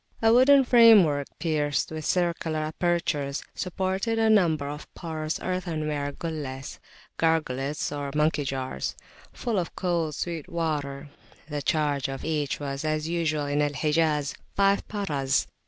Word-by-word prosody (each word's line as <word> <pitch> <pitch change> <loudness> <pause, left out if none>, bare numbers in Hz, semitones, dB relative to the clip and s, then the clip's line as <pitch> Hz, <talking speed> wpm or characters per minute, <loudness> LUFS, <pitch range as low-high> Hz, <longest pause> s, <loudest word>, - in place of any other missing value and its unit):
A 225 0 +4
wooden 270 +3 +7
framework, 215 - +6
pierced 150 -5 0
with 155 -1 -5
circular 170 -3 0
apertures, 155 -3 -1
supported 190 +4 -1
a 225 -1 +4
number 160 -9 +3
of 150 +1 -7
porous 160 -2 -4
earthenware 155 -6 -2
gullehs 145 -5 -5 0.4
(gargoulettes, 150 -4 0
or 145 -1 -3
monkey 150 -1 +2
jars) 130 - -3 0.4
full 225 -5 -1
of 175 - -4
cold, 170 -4 -1
sweet 165 -4 -4
water; 150 -4 -3 0.4
the 145 -1 -3
charge 145 -2 0
for 135 0 -2
each 150 -3 -1
was, 140 -1 -4
as 155 0 -1
usual 160 -3 0
in 145 +1 0
Al 145 0 +1
Hijaz, 150 0 +1 0.2
five 200 0 +2
paras. 150 -11 0
155 Hz, 135 wpm, -26 LUFS, 145-175 Hz, 0.4 s, wooden